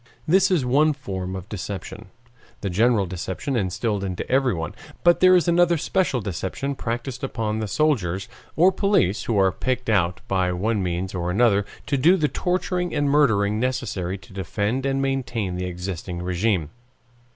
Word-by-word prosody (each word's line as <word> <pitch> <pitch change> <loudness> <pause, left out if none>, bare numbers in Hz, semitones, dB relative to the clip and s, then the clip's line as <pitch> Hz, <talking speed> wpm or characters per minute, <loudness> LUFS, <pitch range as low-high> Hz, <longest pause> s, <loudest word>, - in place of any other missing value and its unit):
This 190 +4 +4
is 170 -9 +2
one 150 +5 +3
form 95 -9 -5
of 95 0 -7
deception, 100 -3 -6 0.5
the 100 - -2
general 110 +1 +3
deception 95 - -4
instilled 100 0 -1
into 95 -2 -4
everyone, 125 - +1 0.3
but 175 0 +5
there 185 0 +7
is 180 -1 +3
another 170 0 +4
special 160 -6 0
deception 100 - -3
practiced 120 +1 -4
upon 110 -4 -2
the 110 - -2
soldiers 100 - 0 0.3
or 180 +4 +5
police 190 - +1
who 115 - 0
are 95 -1 +4
picked 130 0 -2
out 90 -4 +1
by 95 -2 +1
one 105 +4 0
means 90 +1 -2
or 90 -2 -2
another 100 0 +3 0.2
to 140 - 0
do 170 +8 +5
the 155 -4 +2
torturing 180 +1 -1
and 145 -1 +1
murdering 110 -8 +3
necessary 115 -7 -2
to 95 - -17
defend 105 +7 -2
and 135 0 0
maintain 125 -8 -2
the 90 0 -3
existing 90 -1 -5
RÉGIME. 90 -2 0
110 Hz, 160 wpm, -23 LUFS, 95-140 Hz, 0.5 s, there